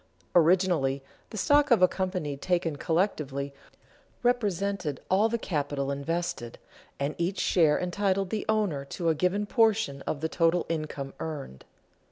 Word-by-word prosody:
Originally 170 -6 +3 0.3
the 215 - -7
stock 290 +7 +4
of 230 -7 +5
a - - +9
company 185 -7 -2
taken 170 +1 0
collectively 145 -5 -1 0.7
represented 200 - 0
all 205 +4 +4
the 235 - 0
capital 145 -8 -2
invested, 140 -4 -3 0.4
and 140 +2 -1
each 175 +3 -1
share 160 -5 +3
entitled 190 +1 0
the 215 - -1
owner 205 -10 +1
to 165 +4 -2
a - - +4
given 180 +6 0
portion 220 - +2
of 145 - -2
the 160 - 0
total 165 +1 +2
income 150 -4 -4
earned. 145 - -6
170 Hz, 140 wpm, -28 LUFS, 145-200 Hz, 0.7 s, a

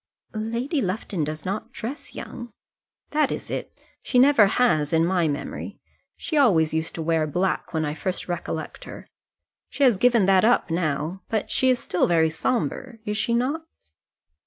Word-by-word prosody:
"Lady 235 +7 -2
Lufton 185 -4 -2
does 155 +1 -5
not 195 +3 -4
dress 250 +7 -7
young." 240 -1 -7 0.6
"That 305 0 +2
is - - -5
it. - - -4 0.3
She 255 - -1
never 255 -5 +6
has, 195 -10 +2
in 165 0 +4
my 175 -2 +2
memory. 145 -1 -5 0.4
She 310 - -3
always 165 - +4
used 160 +1 -2
to 165 - -4
wear 160 -1 +1
black 180 +5 -1
when 160 -1 -1
I 150 - -2
first 185 +4 -3
recollect 170 -3 -5
her. - - -10 0.6
She 285 - -1
has 245 -7 +5
given 235 -2 +4
that 190 -1 +4
up 230 -6 +3
now; 165 +2 -1
but 220 -2 -2
she 260 - +2
is 255 - +4
still 180 - 0
very 160 -2 +3
sombre; 240 +6 -2
is 210 - -2
she 235 +1 0
not?" 285 +7 -1
195 Hz, 170 wpm, -24 LUFS, 160-245 Hz, 0.6 s, never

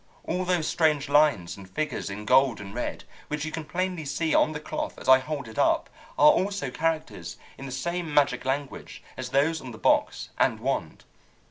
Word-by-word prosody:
All 185 0 -2
those 175 -3 +1
strange 150 -4 +1
lines 140 - +3
and 95 -2 -12
figures 155 +2 -3
in 105 +2 -6
gold 130 +1 +4
and 100 -1 -8
red, 120 - -4 0.2
which 150 0 -3
you 155 - -4
can 160 - -4
plainly 180 +1 -2
see 155 +3 -1
on - - +4
the 150 - -5
cloth - - -5
as - - -10
I 130 0 +8
hold 140 -1 -5
it 110 - -7
up, - - +2 0.3
are 150 +1 +8
also 195 -8 -1
characters 160 +2 -2 0.2
in 135 - -8
the - - -7
same 170 +5 -3
magic 145 -1 +2
language 135 +2 -4
as 130 -1 -5
those 150 +5 +1
on 130 - -8
the 115 - -9
box - - +1
and - - +2
wand. - - -3
145 Hz, 200 wpm, -26 LUFS, 130-160 Hz, 0.3 s, I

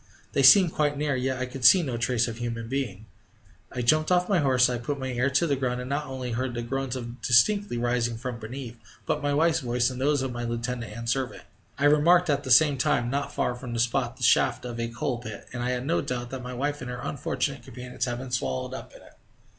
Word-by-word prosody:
They 140 - +2
seemed 170 +6 +8
quite 145 -1 0
near, 145 0 0
and 130 - -2
yet 130 0 -1
I 130 - -2
could 125 0 -8
see 180 +7 +7
no 130 -6 -3
trace 115 0 +1
of 115 -1 -6
a - - -12
human 115 -1 -4
being. 115 -6 -3 0.7
I 125 - -3
jumped 155 +7 +3
off 180 0 +3
my 195 -4 +2
horse; 130 -3 +4
I 125 -1 -2
put 140 +4 -3
my 130 -1 -4
ear 125 +2 0
to 140 +5 +2
the 145 -4 +1
ground, 125 -2 -2
and 125 +2 -6
not 145 +1 -2
only 130 -2 -5
heard 125 +1 -2
the 120 - -3
groans 130 +1 -3 0.2
distinctly 125 - +3
rising 120 -1 0
from 125 0 -5
beneath, 120 +1 -7 0.3
but 150 - -1
my 145 0 0
wife's 160 +3 +2
voice 125 0 0
and 130 0 -6
those 145 0 +2
of 135 - -3
my 120 0 -5
lieutenant 120 0 -3
and 115 0 -6
servant. 130 +2 -2 0.3
I 140 - +1
remarked 165 +3 +5
at 140 0 0
the 130 - -6
same 140 +2 +5
time, 120 -2 +1
not 140 +1 -2
far 125 - -1
from 120 0 -7
the 115 - -2
spot, 120 +1 0
the - - -7
shaft 125 -1 +3
of 120 -1 -6
a 115 - -1
coal 120 +1 -3
pit, 110 -4 -8
and 120 - -4
I 125 - -1
had 125 0 -2
no 165 +4 +1
doubt 120 -1 -4
that 130 -1 -5
my 125 0 -6
wife 145 +3 -2
and 125 - -6
her 125 0 -5
unfortunate - - -2
companions 125 0 -5
had 120 -1 -3
been 130 0 -7
swallowed 65 - -2
up - - -9
in - - -14
it. - - -18
125 Hz, 255 wpm, -26 LUFS, 120-140 Hz, 0.7 s, seemed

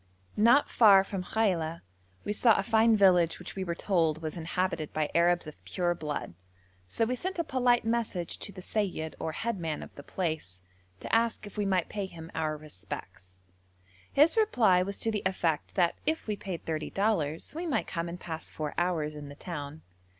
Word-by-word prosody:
Not 235 +7 +5
far 200 -4 +7
from 195 -1 -4
Khaila, 170 -6 0 0.4
we 205 - -1
saw 225 0 +4
a - - +1
fine 225 -1 +4
village 180 -4 +5
which 180 - -8
we 190 - -2
were 170 -2 -2
told 165 -5 +1
was 155 -1 -4
inhabited 170 -1 -2
by 155 -1 -1
Arabs 170 +1 +3
of 155 - -11
pure 175 -2 0
blood, 150 - -4 0.5
so 225 - 0
we 245 - -1
sent 370 +9 -3
a 335 - +1
polite 245 -4 +2
message 225 -7 -1
to - - -4
the 185 -2 -10
seyyid, 180 -8 -2
or 160 - -3
head 230 +2 -2
man 160 -3 -3
of - - -12
the - - -10
place, 155 - -4 0.4
to - - 0
ask 230 -1 +1
if 205 - -11
we 205 -1 0
might 185 -3 +1
pay 200 -2 -4
him 165 -2 -10
our 155 -1 -1
respects. 95 -9 -9 0.7
His 300 +4 +5
reply 235 - +4
was 195 +2 -3
to 225 - +3
the 210 -2 -1
effect 170 -5 -1
that 175 -3 +3
if 320 +1 0
we 215 - -1
paid 190 -4 -6
thirty 155 -1 -2
dollars 180 -7 0
we 340 +3 -4
might 290 - 0
come 170 0 -3
and 175 +1 -7
pass 160 -3 -6
four 150 -1 -4
hours 165 -4 0
in 145 -1 -8
the 145 - -10
town. 150 -3 -7
180 Hz, 195 wpm, -29 LUFS, 160-215 Hz, 0.7 s, far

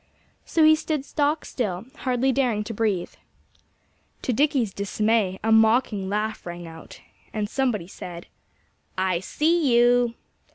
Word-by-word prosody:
So 325 - +2
he 310 0 +7
stood 305 -3 -3
stock 295 +1 0
still, 195 -6 -3
hardly 255 0 +1
daring 245 -6 +1
to 225 - -6
breathe. 205 -5 -1 1.1
To 250 - 0
Dickie's 265 -6 +1
dismay, 200 -1 0
a 225 - +1
mocking 220 -3 +3
laugh 215 +2 -2
rang 175 0 -7
out. 160 0 -12 0.3
And 210 -1 -2
somebody 235 -7 -1
said: 175 -1 -9 0.7
"I 185 -2 +1
see 305 - +1
you!" 240 0 +4
225 Hz, 130 wpm, -24 LUFS, 195-265 Hz, 1.1 s, he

